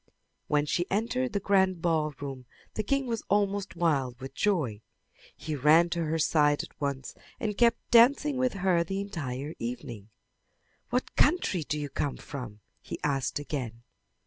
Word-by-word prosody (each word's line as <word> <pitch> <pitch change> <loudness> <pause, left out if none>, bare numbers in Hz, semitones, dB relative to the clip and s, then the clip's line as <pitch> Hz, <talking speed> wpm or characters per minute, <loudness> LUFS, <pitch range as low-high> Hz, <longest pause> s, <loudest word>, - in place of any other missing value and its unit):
When 145 0 +2
she 175 +4 0
entered 240 +5 0
the 200 - +1
grand 190 -2 +2
ball 155 -3 0
room 135 -3 -7 0.3
the - - -1
king 275 +6 0
was 230 -2 -2
almost 200 -1 +1
wild 140 -8 0
with 135 +1 -8
joy. 145 - 0 0.6
He 155 -1 -4
ran 155 +5 +5
to 170 -1 0
her 160 +1 0
side 150 -2 +3
at - - -14
once 140 -2 -3 0.3
and 210 -2 -2
kept 235 +2 +2
dancing 265 +4 +5
with 255 -1 +1
her 185 -3 +2
the 195 +3 -3
entire 150 -7 -4
evening. 120 -3 -6 0.8
"What 250 +1 -1
country 290 - +3
do 150 +1 -2
you 145 -1 -4
come 140 -2 -2
from?" 120 -7 -8 0.2
he - - -6
asked 135 -3 0
again. 130 -5 -5
160 Hz, 160 wpm, -29 LUFS, 140-200 Hz, 0.8 s, ran